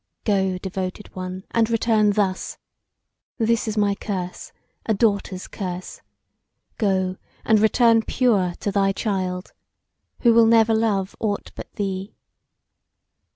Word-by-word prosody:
Go, 190 -3 +1
Devoted 190 +1 -5
One, 185 +1 -6
and 230 -1 +2
return 220 -2 +3
thus! 195 -2 -1 0.8
This 230 -1 +1
is 215 0 -3
my 205 -1 +3
curse, 185 -3 -5 0.4
a 220 - +2
daughter's 200 -3 0
curse: 185 -2 -6 0.8
go, 190 -3 +1 0.3
and 220 -1 +4
return 225 +1 +4
pure 205 -8 +1
to 205 - -1
thy 195 -1 +2
child, 185 -3 -3 0.7
who 235 -2 +5
will 230 0 +6
never 225 0 +5
love 210 -4 0
aught 205 -2 -2
but - - -9
thee. 195 0 -4
205 Hz, 120 wpm, -23 LUFS, 190-220 Hz, 0.8 s, will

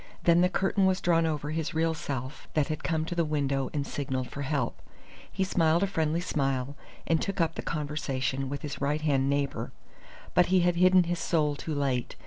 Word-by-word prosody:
Then 170 0 +5
the 180 - +4
curtain 190 +1 +2
was 190 0 +2
drawn 165 -1 +2
over 150 -1 -2
his 160 +1 -3
real 165 0 +2
self 135 -3 -5
that 150 -3 +2
had 155 - -3
come 160 -1 0
to 175 - -4
the 170 -1 +1
window 140 -3 0
and 145 -2 -2
signalled 130 -3 -3
for 140 - -5
help. 140 -3 -2 0.5
He 190 - 0
smiled 170 -2 +2
a - - +4
friendly 165 -3 0
smile, 135 -5 -1 0.3
and 160 -1 +2
took 195 -1 -3
up 165 -1 +2
the - - -5
conversation 135 -3 -2
with 145 +2 -5
his 145 -2 -5
right 145 +2 0
hand 140 -3 +2
neighbour. 140 -1 -1 0.6
But 180 - +4
he 185 0 +4
had 175 0 +2
hidden 185 0 +6
his 175 0 -2
soul 150 -3 +1
too 155 +1 -4
late. 135 -3 -1
155 Hz, 205 wpm, -28 LUFS, 140-170 Hz, 0.6 s, hidden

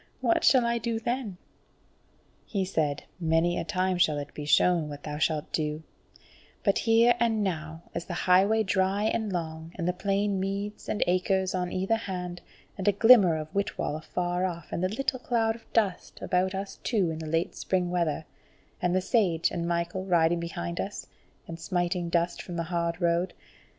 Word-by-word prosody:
What 340 - +2
shall 255 -3 +5
I 235 0 +1
do 230 0 -2
then?" 235 -5 -3 1.1
He 195 -3 -1
said: 155 -6 -1 0.2
"Many 165 +1 +2
a - - -2
time 185 -2 0
shall 155 -4 +3
it 145 0 -6
be 150 - -6
shown 165 +1 +3
what 145 -1 -8
thou 150 -1 -5
shalt 155 -1 0
do; 155 0 -1 0.8
but 200 - +3
here 230 +1 +5
and 225 -2 +2
now 165 -3 -4
is - - -4
the 175 - -5
highway 195 +5 +4
dry 190 +1 +1
and 220 -1 0
long, 160 -1 -4
and 170 -2 -3
the 180 - +1
plain 200 +1 0
meads 200 +2 -4
and 210 - +1
acres 185 +1 +1
on 180 -1 -2
either 195 +5 +1
hand, 180 -4 -5 0.4
and 190 - -3
a - - +7
glimmer 205 -6 +7
of 155 0 -7
Whitwall 200 -6 -1
afar 175 +3 -2
off, 170 -4 -4
and 170 - -2
the 185 - +2
little 255 +4 -2
cloud 225 -2 +1
of 230 - -17
dust 200 -6 0
about 185 +1 0
us 195 +1 -5
two 195 -8 +1
in 160 - -5
the 160 - -6
late 165 +2 0
spring 180 -2 -1
weather; 165 -3 0 0.6
and 180 0 +1
the 185 - +2
Sage 180 -6 +2
and 170 0 -2
Michael 170 +2 -1
riding 170 -2 +3
behind 85 - -4
us, - - -4 0.4
and 165 0 -7
smiting 175 0 -1
dust 170 0 0
from 175 - -7
the 170 - -1
hard 170 0 -1
road. 170 +1 +1
180 Hz, 185 wpm, -28 LUFS, 170-200 Hz, 1.1 s, a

